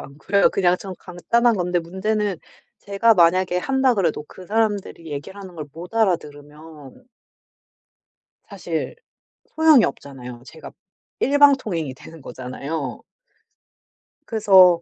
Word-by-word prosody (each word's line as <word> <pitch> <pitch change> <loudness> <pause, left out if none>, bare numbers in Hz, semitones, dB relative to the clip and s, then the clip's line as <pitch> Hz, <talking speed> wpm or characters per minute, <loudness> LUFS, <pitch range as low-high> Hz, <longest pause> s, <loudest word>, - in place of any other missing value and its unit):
않고요. 155 +8 +1
그냥 180 -2 +2
좀 190 -2 -8
간단한 235 +7 +1
건데 180 0 0
문제는 190 +3 -2 0.4
제가 205 +3 +2
만약에 180 0 +3
한다 265 +6 +1
그래도 170 -7 -1
그 185 +3 -13
사람들이 205 -5 -1
얘기하는 190 +5 -8
걸 155 -3 -7
못 175 +7 -10
알아 215 -6 +3
들으면 150 - -14 1.4
사실 - - -5 0.6
소용이 315 -6 +6
없잖아요. 125 -4 -7
제가 160 - -11 0.5
일방통행이 265 - +3
되는 160 +4 -14
거잖아요. 130 +2 -6 1.2
그래서 190 -6 +5
180 Hz, 265 characters per minute, -22 LUFS, 155-215 Hz, 1.4 s, 소용이